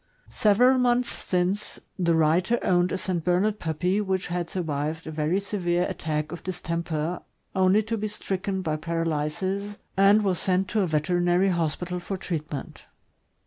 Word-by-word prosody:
Several 245 +5 +4
months 245 0 +2
since, 185 +3 -1 0.2
the 170 -2 +3
writer 165 +8 +3
owned 175 -1 +2
a - - 0
St. 180 -3 -2
Bernard 195 +5 +1
puppy 180 +5 0
which 190 -2 -1
had 175 -1 -3
survived 160 -2 -3
a 160 - -5
very 155 +4 0
severe 180 -4 0
attack 155 0 -3
of 175 - -6
distemper 170 -2 -3 0.3
only 190 +3 +4
to 225 +1 -2
be 215 - -1
stricken 195 -2 -3
by 155 -3 -1
paralysis, 165 +5 -2 0.2
and 200 +2 +5
was 185 -4 +1
sent 185 0 +1
to 215 - +1
a 190 - +1
veter 160 +3 +1
inary 175 +2 +3
hospital 175 +1 -1
for 190 +2 -4
treatment. 155 -6 -5
180 Hz, 155 wpm, -26 LUFS, 165-195 Hz, 0.3 s, and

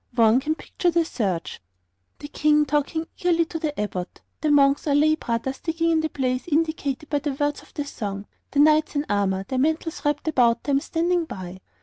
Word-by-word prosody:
One 230 0 +5
can 310 +3 -1
picture 350 - -2
the 335 -1 +2
search: 195 - -3 0.6
the 290 - -8
King 300 0 +2
talking 295 +3 -1
eagerly 340 -1 +2
to 325 - -5
the 305 -3 -3
Abbot; 185 -3 -4 0.2
the 310 - +1
monks 280 0 +4
or 285 - +3
lay 305 +2 +4
brothers 265 -2 -3
digging 330 0 0
in 320 - +3
the 315 - -1
place 255 -1 -2
indicated 305 -3 -1
by 290 -1 0
the 285 0 -3
words 290 +1 -1
of - - -20
the 290 - -2
song; 200 -7 -5 0.2
the - - -6
knights 305 0 +4
in 285 +1 0
armour, 195 -1 0
their 260 - -1
mantles 315 +2 -1
wrapped 290 +1 -1
about 240 -6 +3
them, 275 -1 +2
standing 340 +3 0
by. 185 - -8
290 Hz, 200 wpm, -24 LUFS, 255-315 Hz, 0.6 s, One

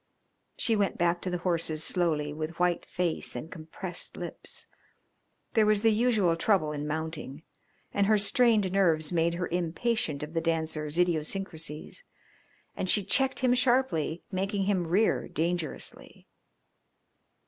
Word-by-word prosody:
She 225 - +1
went 200 -3 0
back 175 0 +1
to 185 - -2
the 180 - -1
horses 165 -3 -1
slowly 155 -5 0
with 155 +2 -5
white 180 -1 +1
face 175 -3 -2
and 160 - -6
compressed 170 +2 -7
lips. - - -7 0.9
There 220 -2 +4
was 210 0 +3
the 225 - +6
usual 215 -6 +3
trouble 165 -3 +2
in 150 0 -4
mounting, 155 -1 -4 0.5
and 200 -1 +2
her 215 0 +5
strained 215 -2 +3
nerves 165 -6 +2
made 170 0 +2
her 175 0 -2
impatient 175 -1 -1
of 150 +2 -7
The 165 - 0
Dancer's 160 -2 -1
idiosyncrasies, 170 - -2 0.7
and 185 - -2
she 205 - +3
checked 265 +8 +1
him 250 -1 +4
sharply, 245 - +1
making 195 +1 -1
him 190 -3 +1
rear 200 +7 +2
dangerously. 170 -1 -4
175 Hz, 135 wpm, -29 LUFS, 160-205 Hz, 0.9 s, the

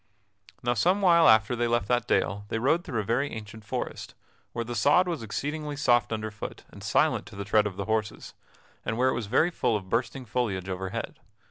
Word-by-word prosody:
Now 120 0 +2
some 180 - +2
while 170 -3 +6
after 110 +2 +4
they 120 0 0
left 120 -3 0
that 120 0 +1
dale 100 +2 0
they - - -1
rode 145 +9 +2
through 125 - -2
a - - -5
very 120 +7 0
ancient 110 0 -8
forest, - - -5 0.4
where 115 - -3
the 120 - -5
sod 145 +10 +4
was 165 -7 -2
exceedingly 145 +7 -4
soft 120 -6 +2
underfoot 110 -1 -5
and - - -12
silent - - +1
to 105 - -12
the 100 0 -5
tread 105 0 +3
of 95 -2 -7
the 100 - -3
horses, 110 0 -2 0.5
and 110 - -2
where 130 +1 +3
it - - +1
was 115 -3 -3
very 165 - +3
full 120 -8 0
of 95 -2 -10
bursting 125 +3 -1
foliage 100 -5 -2
overhead. 95 0 -4
115 Hz, 210 wpm, -27 LUFS, 105-135 Hz, 0.5 s, while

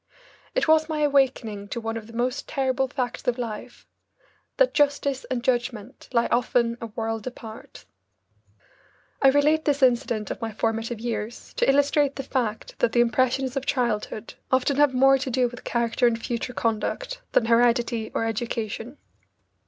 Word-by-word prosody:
It - - +1
was 315 0 +4
my 305 -1 -1
awakening 265 -8 +1
to 235 - -4
one 225 0 -3
of 220 -1 -6
the 230 - -13
most 245 +2 -2
terrible 265 -1 0
facts 250 -2 -4
of 245 0 +1
life 230 -4 -6 0.7
that - - +4
justice 280 -2 +1
and 245 -2 -2
judgment 245 -1 -2
lie 235 -2 +3
often 235 -1 +2
a 230 - -4
world 225 +1 -4
apart. 225 -3 -10 1.4
I 275 - +6
relate 295 +3 +4
this 285 -2 +1
incident 240 -4 +2
of - - -6
my 225 -1 -3
formative 225 +1 -2
years 230 0 -5
to - - +1
illustrate 285 0 +3
the 275 - -4
fact 240 -5 -3
that 225 - +2
the 240 - +3
impressions 255 +2 +1
of 275 0 -3
childhood 230 -3 -1 0.2
often 260 +2 +2
have 290 -3 +4
more 270 +1 +5
to 265 0 -3
do 255 0 +2
with 245 +1 -10
character 235 +1 +1
and 230 -1 0
future 240 +1 -3
conduct 235 - -2
than 225 - +4
heredity 235 -1 +2
or 225 - +1
education. 225 +2 -3
245 Hz, 160 wpm, -25 LUFS, 230-270 Hz, 1.4 s, I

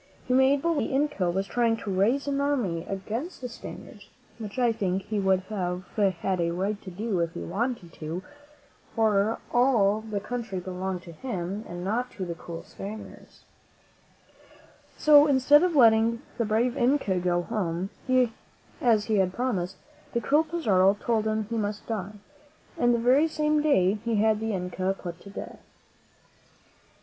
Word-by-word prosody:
He 250 - +1
made 265 +2 +4
believe 335 -2 +1
that - - 0
the - - -2
Inca 280 -11 +1
was 190 +3 -1
trying 230 +1 +1
to 210 - -5
raise 230 +10 +2
an 280 0 0
army 235 -13 0
against 220 - -4
the 250 - -5
Spaniards 235 - -10 0.3
(which 210 0 -7
I 245 -2 +3
think 195 -3 -1
he 210 +1 -2
would 190 -1 +2
have 185 -2 -3
had 190 -3 0
a 170 - +1
right 195 +4 -2
to 190 - -9
do 200 +1 -2
if 165 -1 -1
he - - -5
wanted 205 -2 -3
to, 165 +4 -5 0.7
for, 215 -2 +3
after - - -11
all, 220 -5 +4
the 215 -2 -4
country 225 -3 -4
belonged 185 0 -4
to 170 - -10
him 195 0 -4
and 175 0 -6
not 235 +6 -1
to 190 - -4
the 170 - -4
cruel 165 0 -8
Spaniards); 210 +2 -10 1.5
so, 295 -1 +7
instead 285 +1 +5
of 355 -2 +1
letting 230 -1 +5 0.2
the 230 - +2
brave 230 +4 +1
Inca 245 -8 +2
go 175 0 0
home, 185 -3 -2 0.9
as 220 -4 +3
he 215 -2 +1
had 185 -2 +2
promised, 195 -7 -2 0.4
the 235 - +1
cruel 295 +6 +3
Pizarro 205 - +3
told 220 -2 0
him 215 0 0
he 230 +2 -4
must 205 -1 -3
die, 210 -3 -4 0.6
and 240 0 +3
the 240 - +3
very 255 +7 +4
same 305 -1 +1
day 210 -9 +3
he 230 -1 0
had 215 0 +3
the 220 0 -2
Inca 185 +1 -2
put 175 -1 -7
to 200 - -13
death. 200 - -8
215 Hz, 170 wpm, -27 LUFS, 185-245 Hz, 1.5 s, so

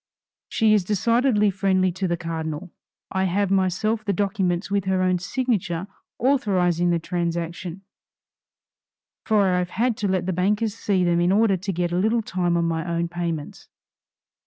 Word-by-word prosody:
She 220 -2 +3
is 210 -3 +3
decidedly 215 +2 +2
friendly 190 -1 +1
to 185 +2 -2
the 170 -1 -1
cardinal. 165 0 -5 0.4
I 190 0 0
have 195 +2 0
myself 195 +4 +1
the 205 - 0
documents 190 -1 -1
with 200 -2 0
her 190 -1 +1
own 185 -1 +2
signature 190 -5 -1 0.3
authorizing 185 -10 +2
the 170 - +2
transaction, 170 +1 -3 1.4
for 215 -2 +4
I 180 - +2
have 180 0 -2
had 235 +5 0
to 205 - -1
let 185 -2 0
the 185 - -1
bankers 205 +4 +1
see 200 -4 0
them 175 -1 +2
in 175 +1 +3
order 210 0 +4
to 190 +2 -3
get 175 -1 -1
a 175 - 0
little 220 +3 +1
time 175 -3 0
on 170 - +1
my 165 -1 -1
own 170 0 -2
payments." 170 -3 -5
185 Hz, 165 wpm, -23 LUFS, 175-205 Hz, 1.4 s, for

